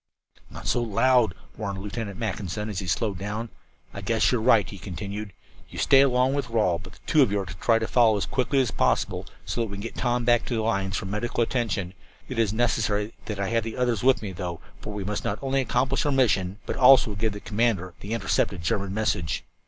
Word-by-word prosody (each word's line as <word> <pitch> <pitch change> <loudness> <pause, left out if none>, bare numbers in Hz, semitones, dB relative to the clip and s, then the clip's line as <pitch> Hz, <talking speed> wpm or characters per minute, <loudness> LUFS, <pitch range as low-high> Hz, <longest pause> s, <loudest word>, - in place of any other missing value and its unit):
"Not - - -10
so 120 - +1
loud," 120 -2 +3 0.2
warned 100 -3 -4
Lieutenant 100 0 -5
Mackinson, 105 -1 -3
as 100 -4 -3
he 95 - -5
slowed 100 +1 -1
down. 105 +4 -4 0.4
"I 100 - -6
guess 110 +2 +2
you 125 - +2
are - - -4
right," 110 -3 +4
he 100 - -9
continued. 100 +3 -6 0.4
"You - - -10
stay 135 -1 +5
along 130 -1 +3
with 140 -3 -2
Rawle, 105 -7 +1
but 95 +1 -12
the - - -18
two 155 - +4
of 130 - +4
you 100 -1 0
try 115 -1 +3
to 115 - -1
follow 115 -4 +4
as 100 - -1
quickly 135 +2 0
as 125 -3 -1
possible, - - 0 0.2
so 120 - -2
that 115 - -1
we 100 -1 -7
can - - -6
get 115 - -5
Tom 120 -1 0
back 120 -1 +4
to 120 - -2
the 110 - 0
lines 100 -4 0
for - - -4
medical 105 +4 -1
attention. 105 -7 -2 0.3
It 130 -3 -4
is 110 -3 +2
necessary 110 -2 0
that 105 -2 -5
I 100 - -1
have 115 -1 +1
the 115 0 -6
others 120 -4 +1
with 130 -2 +3
me, 100 - -4
though, 90 -2 -5 0.2
for 105 - -6
we 105 -1 -4
must 105 +1 -3
not 100 - -1
only 135 0 +1
accomplish 130 +1 0
our 145 - +1
mission, 100 -8 +2
but - - -3
also 130 -4 +6
give 105 +2 -1
the 105 - -6
commander 105 -5 0
that - - -9
intercepted 100 -4 0
German 95 +2 -1
message." 95 -7 -1
110 Hz, 230 wpm, -26 LUFS, 100-120 Hz, 0.4 s, also